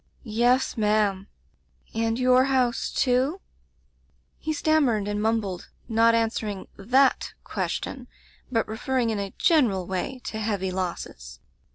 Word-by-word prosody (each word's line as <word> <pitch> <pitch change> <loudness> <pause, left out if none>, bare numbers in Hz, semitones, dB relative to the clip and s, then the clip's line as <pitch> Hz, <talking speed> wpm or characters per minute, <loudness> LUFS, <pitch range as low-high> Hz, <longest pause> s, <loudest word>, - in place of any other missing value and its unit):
"'Yes, 240 +3 +1
ma'am/ 210 -2 +1 0.7
"'And 225 0 0
your 255 0 +4
house, 260 -3 +1
too?* 260 +7 +1 1.0
"He 315 - -3
stanmiered 290 -9 +2
and 205 0 -2
mumbled, 215 -5 -1 0.2
not 230 0 +4
an 225 -1 +2
swering 205 -4 -4
that 255 +7 +2
question, - - -4 0.4
but 230 -2 +1
referring 235 +2 -1
in 215 - -2
a 200 -1 -5
general 240 - +3
way 190 +8 -3
to 220 - -5
heavy 200 -4 -1
losses. 65 - -5
225 Hz, 125 wpm, -25 LUFS, 200-255 Hz, 1.0 s, your